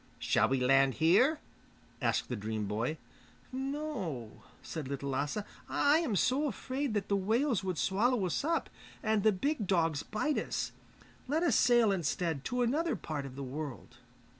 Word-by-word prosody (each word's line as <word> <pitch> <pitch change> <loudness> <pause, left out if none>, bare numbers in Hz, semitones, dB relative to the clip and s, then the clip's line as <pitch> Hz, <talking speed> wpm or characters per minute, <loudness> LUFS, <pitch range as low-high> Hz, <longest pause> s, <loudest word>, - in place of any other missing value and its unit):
'Shall - - +2
we 135 0 +1
land 135 +1 +4
here?' 200 - +4 0.6
asked - - +1
the 125 - -3
dream 110 0 -3
boy. 115 +10 -2 0.5
'No,' 255 - -4 0.2
said 155 -5 -5
Little 140 0 -3
Lasse. 140 +5 -1 0.3
'I 290 +2 +4
am 290 -11 -1
so 265 - +2
afraid 260 +1 -3
that 200 -2 -1
the 200 - +2
whales 220 +3 +1
would 185 -3 -2
swallow 210 +4 +2
us 180 - -1
up, 330 +2 0 0.4
and 215 -1 +2
the 215 - +5
big 220 +2 -1
dogs 165 -6 +2
bite 285 +8 -1
us. - - -3 0.6
Let 310 +5 +1
us 285 -10 +3
sail 240 -3 +5
instead 165 -4 -1
to 250 0 0
another 295 +5 +1
part 150 -6 -4
of 130 - -10
the 140 - -5
world. 140 0 -6
195 Hz, 165 wpm, -32 LUFS, -, 0.6 s, the